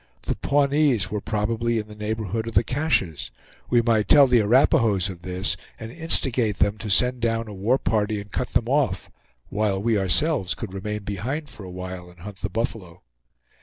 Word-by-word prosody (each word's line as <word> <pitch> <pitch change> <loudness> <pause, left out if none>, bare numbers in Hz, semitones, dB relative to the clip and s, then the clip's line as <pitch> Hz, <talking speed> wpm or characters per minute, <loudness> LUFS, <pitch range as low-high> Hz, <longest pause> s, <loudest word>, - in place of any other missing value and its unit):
The - - -2
Pawnees 140 -7 +2
were 105 -1 -2
probably 115 +2 -1
in 105 -1 -3
the 105 - -11
neighborhood 110 +1 -3
of 115 - -6
the - - +5
Caches; 125 - -1 0.4
we 120 -1 +3
might 110 -3 +2
tell 145 -1 +8
the 125 -2 +4
Arapahoes 105 -4 +3
of 90 -3 -8
this 90 +2 -1 0.2
and 115 0 -7
instigate 125 - 0
them 105 +1 +1
to 110 - -5
send 125 +5 +3
down 115 0 0
a 105 - -8
war 105 +7 +1
party 105 -1 0
and 100 0 -10
cut 125 - -2
them 115 - +1
off, 140 +1 0 0.4
while 105 -2 0
we 110 +1 +1
ourselves 95 - +1
could 95 - -7
remain 105 +2 -4
behind 130 +10 -4
for 105 - -11
a - - -8
while 90 0 -7
and 90 -1 -18
hunt 100 +1 -9
the 100 - -4
buffalo. 100 - -4
110 Hz, 190 wpm, -24 LUFS, 100-120 Hz, 0.4 s, tell